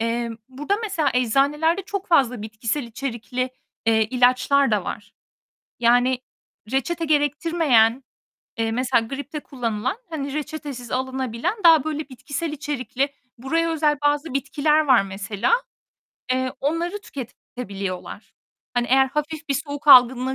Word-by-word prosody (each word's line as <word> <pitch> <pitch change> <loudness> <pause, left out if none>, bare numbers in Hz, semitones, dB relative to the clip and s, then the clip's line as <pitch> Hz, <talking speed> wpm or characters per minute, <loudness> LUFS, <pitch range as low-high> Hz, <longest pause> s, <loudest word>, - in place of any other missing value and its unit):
Emm, 230 0 -2
burada 295 +10 -2
mesela 335 -9 0
eczanelerde 285 - +2
çok 395 +1 -5
fazla 255 -9 +3
bitkisel 220 +6 -3
içerikli, 245 +1 -4 0.4
eee, 220 -1 +4
ilaçlar 255 +2 +3
da 210 -4 +1
var. 205 0 -7 0.7
Yani 245 +2 +3 0.5
reçete 330 +6 -1
gerektirmeyen, 290 -5 +2 0.6
eee, 225 0 0
mesela 250 -1 +1
gripte 285 +4 -6
kullanılan, 235 - -3
hani, 285 -4 -4
reçetesiz 290 -5 -5
alınabilen 260 - -2
daha 325 -4 +7
böyle 310 -1 -3
bitkisel 285 +5 -5
içerikli, 275 -2 -2 0.3
buraya 330 +7 0
özel 305 -2 +2
bazı 290 0 0
bitkiler 285 +2 +1
var 255 -6 +6
mesela, 195 - -2 0.8
eee, 255 0 -1
onları 340 +7 -1
tüketebiliyorlar. 220 - -7 0.4
Hani 240 0 +1
eğer 265 +1 +5
hafif 300 +3 -4
bir 275 - +1
soğuk 285 +1 -4
algınlığı 255 0 +7
265 Hz, 120 wpm, -23 LUFS, 240-300 Hz, 0.8 s, daha